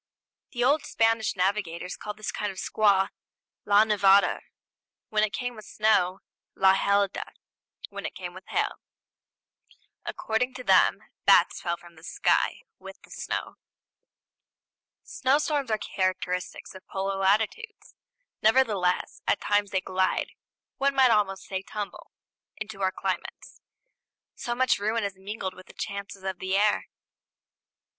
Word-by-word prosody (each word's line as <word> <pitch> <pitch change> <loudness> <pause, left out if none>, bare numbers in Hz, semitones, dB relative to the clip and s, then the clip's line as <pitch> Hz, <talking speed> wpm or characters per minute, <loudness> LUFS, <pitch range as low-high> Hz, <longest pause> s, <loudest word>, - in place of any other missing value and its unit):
" - - -62
The 240 -1 0
old 285 +4 +3
Spanish 225 -2 +1
navigators 180 -2 -1
called 210 -1 -7
this 215 - -4
kind 205 -1 -2
of 190 - -13
squall 195 -1 +2 0.6
la 205 +1 +6
nevada, 200 -2 +4 0.7
when 215 -1 +2
it 215 - +1
came 245 +2 -3
with 215 -2 -11
snow; 205 -4 +2 0.3
la 190 0 +5
helada, 200 0 +1 0.6
when - - -5
it - - -10
came - - -6
with - - -12
hail. - - -1 1.3
According 250 +3 -2
to 255 - -7
them, - - +4 0.2
bats - - +5
fell 170 0 -1
from 170 -1 -17
the 160 - -16
sky, 185 - +1 0.2
with - - -11
the - - -18
snow. - - -4 1.5
Snowstorms 285 0 +1
are 215 - +2
characteristic 185 -2 -2
of 190 - -13
polar 195 0 -2
latitudes; 220 - 0 0.5
nevertheless, 215 -6 +2
at - - +2
times 205 0 +1
they 190 -1 0
glide 185 0 0 0.5
one 275 0 +2
might 260 -2 +6
almost 200 -3 +1
say 190 -1 -4
tumble 205 +1 -7 0.5
into 215 -2 -7
our 190 -1 +2
climates; - - -5 0.7
so 240 - -4
much 260 -3 +2
ruin 220 +2 0
is 200 -1 -2
mingled 190 0 -5
with 185 0 -14
the - - -14
chances 200 -1 -6
of 190 -2 -4
the 190 +1 0
air. 210 +1 +2
205 Hz, 140 wpm, -27 LUFS, 190-220 Hz, 1.5 s, la